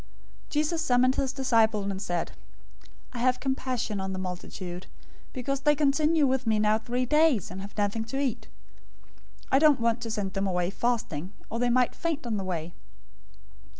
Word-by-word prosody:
015:032 - - -27
Jesus 310 +2 0
summoned 255 -3 +3
his 265 -2 0
disciples 225 -6 +2
and 190 0 -5
said, 175 -4 -2 0.8
"I 240 - -5
have 255 +1 +2
compassion 255 -6 -2
on 190 0 -3
the - - -4
multitude, 180 0 -6 0.4
because 270 +1 -2
they 295 +2 +3
continue 300 +2 +3
with 260 -2 0
me 220 -1 +3
now 215 +1 +3
three 245 +3 -1
days 300 - +3
and 190 +1 -6
have 200 +2 -10
nothing 210 +2 0
to 270 +5 -3
eat. 270 -5 -2 1.0
I 270 - +5
don't 300 -3 +5
want 230 0 +1
to 230 - -4
send 205 -4 -2
them 195 +1 -1
away 180 -1 0
fasting, 200 -7 -2 0.2
or 230 - -2
they 245 0 +2
might 250 0 +3
faint 320 -4 -3
on 225 -3 -1
the 195 - -3
way." 170 -2 -4
235 Hz, 180 wpm, -28 LUFS, 195-265 Hz, 1.0 s, I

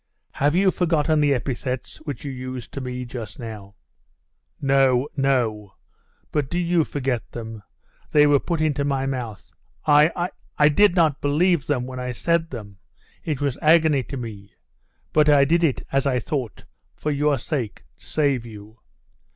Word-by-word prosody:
'Have 145 +3 +1
you 190 +1 +4
forgotten 160 -3 +1
the 145 -1 +3
epithets 130 0 -3
which 150 -2 -7
you 140 - -3
used 130 -1 -7
to 140 - -4
me 125 0 -5
just 115 -4 -7
now?' 105 -4 -8 0.8
'No, 135 -1 +3
no! 115 -8 0 0.6
But 145 -3 -1
do 175 - -2
you 175 -1 +2
forget 130 -5 -2
them; 110 -2 -7 0.5
they 150 -1 +6
were 145 -1 +5
put 170 +1 -2
into 150 -2 +1
my 135 -1 0
mouth. 125 -6 -4 0.4
I 155 +4 +4 0.3
I 150 0 +6
did 195 +4 +4
not 160 -5 +2
believe 155 +2 +2
them 130 -4 0
when 130 0 -7
I 125 0 -3
said 170 +4 0
them. 100 -6 -9 0.4
It 150 -4 -3
was 140 -3 -1
agony 155 -3 +4
to 135 - -6
me; 105 -5 -8 0.6
but 150 0 +4
I 140 -2 +6
did 170 +4 +2
it, 150 -6 +1
as 135 0 +1
I 130 -2 +2
thought, 130 - -4 0.3
for 150 - -2
your 145 0 +2
sake 120 - -4 0.2
to - - -20
save 140 -5 +1
you. 110 -1 -12
140 Hz, 165 wpm, -23 LUFS, 125-150 Hz, 0.8 s, they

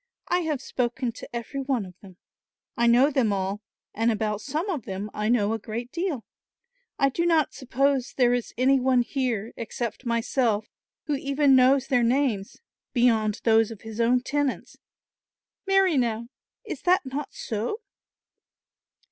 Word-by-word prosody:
I 355 - +3
have 305 -6 -2
spoken 245 0 -2
to 230 - -11
every 240 +3 -5
one 260 -6 -1
of 180 - -12
them. 190 -3 -14 0.6
I 235 - +2
know 250 +5 +5
them 255 -6 +2
all; 195 +1 -2 0.3
and 225 +2 +2
about 210 -1 -1
some 305 - -3
of 315 - -3
them 195 +2 -5
I 210 +1 -1
know 220 -3 +2
a 225 - -2
great 235 +4 -6
deal. 335 - -3 0.7
I 275 - +3
do 335 +6 -1
not 325 -3 +2
suppose 270 0 0
there 245 -2 +4
is 245 -2 -2
any 265 +2 +4
one 255 -1 +3
here, 235 -4 -2
except 235 +1 -4
myself, 230 -2 +1 0.4
who 300 - -1
even 275 0 +3
knows 260 +1 +5
their 250 -3 +2
names, 235 -5 0 0.4
beyond 225 -4 +2
those 225 -1 +4
of 225 -3 -9
his 220 +1 -5
own 245 +2 +3
tenants. 285 0 -2 0.9
Marry, 385 -5 +4
now, 235 -2 -1 0.4
is 360 -10 -6
that 365 -3 +3
not 275 +2 -5
so?" 230 - -3
245 Hz, 155 wpm, -26 LUFS, 225-275 Hz, 0.9 s, know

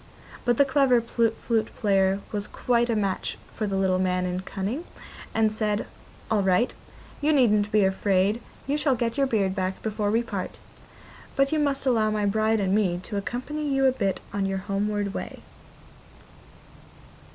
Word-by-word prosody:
But 240 -1 +2
the 280 - +6
clever 270 -2 +4
flute 230 -1 0
player 195 -1 +2
was 210 -1 -3
quite 240 -1 +1
a 230 - +2
match 200 -3 -1
for 215 - -3
the 195 - -2
little 190 -1 +2
man 180 -1 +1
in 180 0 -2
cunning, 200 - -4 0.5
and 220 -1 +2
said: 215 -1 -1 0.5
'All 215 -2 +3
right, 190 +5 +2 0.5
you 300 +2 +3
needn't 210 -7 +3
be 210 -1 +4
afraid, 195 +3 +2 0.2
you 285 +2 0
shall 280 -3 +2
get 230 -1 -1
your 275 -1 +2
beard 200 -6 +1
back 190 -1 -2
before 210 -1 -1
we 225 +3 +2
part; 200 -5 -5 0.8
but 275 0 +2
you 310 - +2
must 280 -2 0
allow 225 -4 +3
my 210 -1 0
bride 220 +2 +2
and 190 -1 +1
me 195 -4 +2
to 210 - -6
accompany 280 +8 -3
you 270 0 +2
a 260 - +6
bit 195 -7 -1
on 200 -1 0
your 195 0 -1
homeward 205 0 -1
way. - - -6
215 Hz, 170 wpm, -26 LUFS, 195-240 Hz, 0.8 s, the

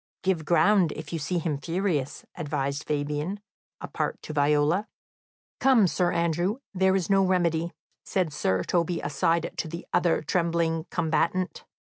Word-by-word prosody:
"Give 185 -5 0
ground, 170 +1 +4
if 155 +1 -8
you 165 - -1
see 150 +5 -1
him 155 -4 -1
furious," 165 -4 -2
advised 145 -3 -2
Fabian 150 +6 -2 0.4
apart - - -3
to 155 - -6
Viola. 150 +7 +2 0.7
"Come, 260 -6 +5
Sir 180 0 +1
Andrew, 170 +5 0 0.2
there 190 0 +3
is 185 -4 0
no 195 -1 +4
remedy," 170 -3 +1 0.3
said 180 -6 -1
Sir 95 -8 0
Toby 175 - 0
aside 165 +3 0
to - - -2
the 170 +2 -7
other 170 -3 +2
trembling 165 0 0
combatant. 170 +3 0
170 Hz, 140 wpm, -26 LUFS, 150-180 Hz, 0.7 s, Come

